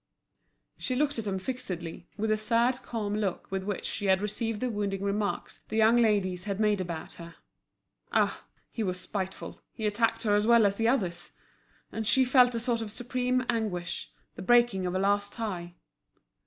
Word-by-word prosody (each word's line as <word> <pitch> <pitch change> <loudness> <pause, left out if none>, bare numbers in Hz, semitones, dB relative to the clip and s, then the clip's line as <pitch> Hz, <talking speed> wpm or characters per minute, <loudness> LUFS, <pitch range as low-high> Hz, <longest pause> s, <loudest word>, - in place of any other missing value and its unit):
She 255 - -2
looked 290 -1 +1
at 215 - -4
him 195 -1 -1
fixedly, 180 -7 -5
with 215 +1 0
the - - +4
sad 235 +3 +2
calm 220 -4 -3
look 205 -4 -2
with 195 0 -1
which 195 +1 -4
she 205 - -2
had 190 0 +4
received 210 +2 -2
the 250 +1 -1
wounding 200 -2 -2
remarks 200 +1 -2
the 220 - -5
young 225 +2 +5
ladies 200 -5 +2
had 200 -1 -3
made 210 -2 +2
about 170 -3 -5
her. 170 0 -10 0.8
Ah! - - +1 0.3
he 230 - -4
was 185 -3 -1
spiteful, 190 0 -5
he 220 - -5
attacked 225 +3 +1
her 210 -2 +2
as 210 +1 +2
well 235 -2 +6
as 200 0 +1
the 225 - +2
others! 180 -9 0 0.6
And 220 -1 -3
she 260 +2 +5
felt 250 -1 +5
a - - 0
sort 235 0 0
of 215 -2 -5
supreme 250 +2 0
anguish, 210 -8 -2 0.2
the - - -9
breaking 240 -4 +4
of 180 - -2
a - - +1
last 205 +1 +1
tie. 180 -6 -4
210 Hz, 185 wpm, -29 LUFS, 190-235 Hz, 0.8 s, well